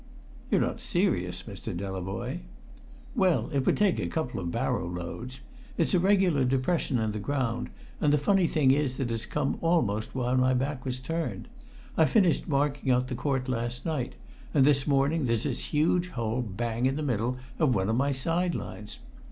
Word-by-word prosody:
"You're - - +3
not - - -1
serious, 90 - 0
Mr. 100 -4 -6
Delavoye." 95 - -4 0.8
"Well, 185 -4 +2
it 135 -2 0
would - - +3
take 205 -3 +3
a - - -1
couple 140 -10 -2
of 85 -2 -3
barrow 85 - -1
loads. 90 +9 -6 0.4
It's - - +2
a 180 - +5
regular 185 -6 +3
depression 130 +2 +1
in 110 -2 0
the 105 - -4
ground, 125 0 -1 0.3
and 150 - +3
the 150 - +5
funny 185 +4 +3
thing 140 -5 +3
is 135 -2 +1
that 125 -3 -2
it's 115 0 -3
come 150 -2 -1
almost 120 -12 +1
while 125 0 +1
my 130 0 +3
back 135 0 -2
was 130 -1 -1
turned. 165 +6 -4 0.5
I - - +6
finished 190 -8 +3
marking 140 -2 +1
out 125 0 +2
the - - -2
court 130 0 -1
last 120 0 -2
night, 150 -7 -2 0.4
and 135 -3 +6
this 140 -2 +3
morning 140 +2 +2
there's 115 -2 +1
this - - -2
huge 170 +4 +2
hole 115 -3 -2
bang 115 +3 -1
in 135 - 0
the 155 - -2
middle 125 -2 0 0.2
of 145 -7 +3
one 95 0 +1
of 110 - +1
my 140 +3 +2
side 165 +6 0
lines! 105 - -6
130 Hz, 185 wpm, -28 LUFS, 115-150 Hz, 0.8 s, I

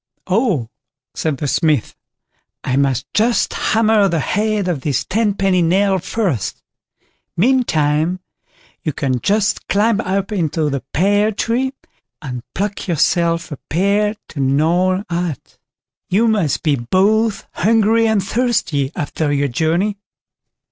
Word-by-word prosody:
"Oh", 185 - +1 0.5
said 155 -4 -2
the 145 - -3
Smith, 145 -2 +1 0.7
"I 130 - -1
must 135 -1 +1
just 230 +2 +2
hammer 220 -2 +2
the 170 -3 0
head 210 +4 0
of 165 -7 -1
this 140 0 -1
tenpenny 195 -3 +1
nail 190 +3 +2
first; 175 - -2 0.7
meantime, 170 - +2 0.6
you 155 - -2
can 130 -2 -1
just 205 - 0
climb 210 +1 +2
up 195 0 -2
into 160 -5 -1
the 140 -1 -2
pear 205 +5 +2
tree, 240 +5 -1 0.5
and 125 -4 -6
pluck 200 +2 -3
yourself 170 0 +1
a 145 - -5
pear 200 +5 +1
to 145 - -8
gnaw 170 +8 +2
at; 170 -4 -4 0.5
you 220 +5 +3
must 200 - 0
be, 150 -3 +2
both 200 - +1
hungry 225 +2 +3
and 215 -3 +1
thirsty 190 - 0
after 145 +1 -2
your 140 0 +1
journey." 170 - 0
185 Hz, 125 wpm, -18 LUFS, 150-210 Hz, 0.7 s, you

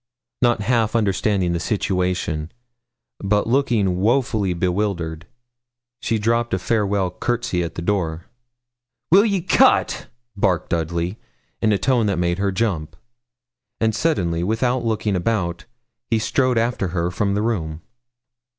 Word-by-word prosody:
Not 120 -4 +3
half 115 0 +1
understanding 100 -4 +1
the 85 - -1
situation, 90 -5 -1 0.7
but 105 +1 +1
looking 115 -7 +1
woefully 110 -5 +1
bewildered, 90 -3 -2 0.7
she 115 -2 0
dropped 115 0 +1
a - - -1
farewell 100 -2 0
courtesy 120 -2 -1
at 85 - -4
the 85 - -4
door. 85 -4 -1 0.9
'Will 200 +5 +7
ye 200 -4 +1
cut?' - - +3 0.3
barked 95 -4 0
Dudley, 85 +3 -1 0.4
in 110 - +3
a 105 - +3
tone 120 +2 +2
that 100 - 0
made 85 +1 0
her 100 0 +1
jump; 95 -7 -2 0.8
and 110 -1 +2
suddenly, 90 - 0
without 120 +5 0
looking 110 -3 0
about, 85 -3 -1 0.4
he 115 - +2
strode 125 +3 +1
after 115 -4 0
her 85 0 -1
from 100 +2 0
the 105 - 0
room. 80 -9 -2
100 Hz, 130 wpm, -21 LUFS, 90-115 Hz, 0.9 s, Will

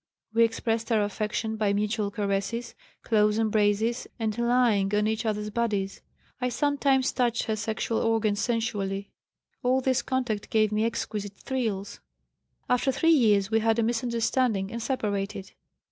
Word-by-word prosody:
We 230 +1 +5
expressed 225 0 -1
our 215 -2 +3
affection 215 +2 -2
by 210 -2 +1
mutual 210 0 0
caresses, 200 +3 -2 0.3
close 210 -2 +3
embraces 220 +1 +1
and 220 -3 -1
lying 235 -4 +2
on 210 0 +2
each 220 +1 -1
other's 210 0 -2
bodies. 205 -4 -1 0.4
I 250 - +1
sometimes 275 -1 +1
touched 240 -2 +1
her 220 - -1
sexual 220 +1 -2
organs 220 -2 +1
sensually. 200 -4 -2 0.5
All 255 +1 +2
this 260 0 +1
contact 250 -6 -2
gave 215 -1 +2
me 215 +1 +1
exquisite 210 -3 -3
thrills. 220 -7 -3 0.7
After 250 +2 +2
three 325 +5 +3
years 210 -7 +3
we 225 - +4
had 225 0 +2
a 230 - +2
misunderstanding 230 -3 0
and 235 - -4
separated. 205 -5 -2
220 Hz, 145 wpm, -27 LUFS, 205-235 Hz, 0.7 s, We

